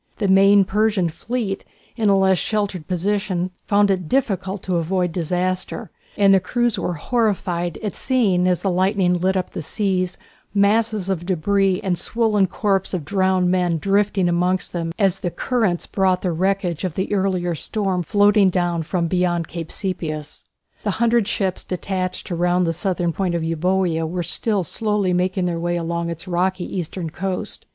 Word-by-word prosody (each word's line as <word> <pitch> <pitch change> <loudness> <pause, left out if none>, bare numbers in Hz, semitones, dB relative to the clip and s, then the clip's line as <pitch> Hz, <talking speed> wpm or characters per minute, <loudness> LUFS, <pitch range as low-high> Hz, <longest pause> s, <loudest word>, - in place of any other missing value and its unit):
The 205 - 0
main 195 +1 +6
Persian 205 -3 +1
fleet, 220 +3 -3 0.3
in 220 -3 +1
a 195 - +5
less 190 -2 +3
sheltered 200 -6 -2
position, 185 0 -1
found 205 -1 +3
it 185 -4 -1
difficult 195 -7 -1
to 185 -2 0
avoid 180 +1 0
disaster, 180 +4 -2 0.3
and 200 -1 +5
the 195 - +6
crews 240 +4 0
were 175 - -2
horrified 180 -4 -1
at 210 - -3
seeing 200 -9 +2
as 180 -2 +1
the 195 - 0
lightning 185 0 +2
lit 185 +2 +1
up 185 - -3
the - - -5
sea 185 +2 0 0.5
masses 205 -1 +2
of 175 -2 -3
debris 195 +2 +1
and 180 -3 0
swollen 215 -3 +2
corpses 195 -2 0
of 165 -5 -4
drowned 185 0 +2
men 180 -2 +1
drifting 195 +1 +1
amongst 180 +2 0
them 165 -2 -2
as 195 -3 +2
the 180 - -2
currents 215 -3 -1
brought 190 -2 +1
the 180 - 0
wreckage 185 0 -1
of 180 -4 -2
the 190 +2 -2
earlier 185 -3 0
storm 190 +2 -1
floating 205 +3 +4
down 175 -2 0
from 170 +2 -1
beyond 175 -1 0
Cape 165 -1 -6
Sepias. 160 -6 -4 0.4
The 210 - -1
hundred 235 -2 +2
ships 190 -2 -1
detached 185 0 -3
to 175 - -4
round 175 +1 +2
the 165 - 0
south 180 +3 -1
point 180 -2 -1
of 170 - -1
Euboea 165 0 0
were 175 +2 -3
still 205 +3 +1
slowly 205 +1 0
making 185 +1 0
their 170 -2 -1
way 175 +1 -1
along 170 0 -2
its 165 +1 -6
rocky 185 +1 0
eastern 175 -2 -4
coast. 185 +2 -4
185 Hz, 170 wpm, -21 LUFS, 175-200 Hz, 0.5 s, main